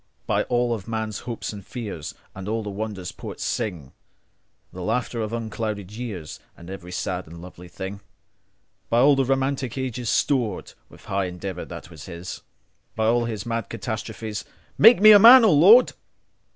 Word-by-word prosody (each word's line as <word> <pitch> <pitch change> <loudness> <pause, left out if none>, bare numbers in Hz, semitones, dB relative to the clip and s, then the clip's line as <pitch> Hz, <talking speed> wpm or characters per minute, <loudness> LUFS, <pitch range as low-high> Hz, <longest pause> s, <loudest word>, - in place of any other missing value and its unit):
By - - 0
all 120 -1 0
of 105 -4 -6
all - - -11
men's 110 -2 -3
hopes 115 -2 -5
and 100 -1 -9
fears, 105 - -7 0.2
And 95 +1 -8
all 110 0 -2
the 105 - -5
wonders 100 -3 -5
poets - - -8
sing, 90 - -3 0.8
The 90 - -8
laughter 120 +4 -2
of 110 0 -3
unclouded 110 -3 -4
years, 105 -9 -7 0.2
And 85 +2 -11
every 90 -2 -9
sad 90 0 -3
and 85 +1 -11
lovely 90 0 -12
thing:By 100 +5 -6
the 135 -1 +2
romantic 135 -1 -1
ages 125 -3 -3
storedWith 120 -9 -2
high 95 0 -1
endeavour 90 0 -6
that 80 - -10
was 75 -3 -11
his, 90 0 -8 0.5
By 110 - 0
all 120 +1 +2
his 110 -3 -5
mad 115 -2 -3
catastrophes, 110 -2 -5 0.3
Make 225 -1 +7
me 215 0 +10
a 205 - +9
man, 235 +3 +9
O 215 - +5
Lord. 195 - +7
110 Hz, 165 wpm, -24 LUFS, 95-120 Hz, 0.8 s, me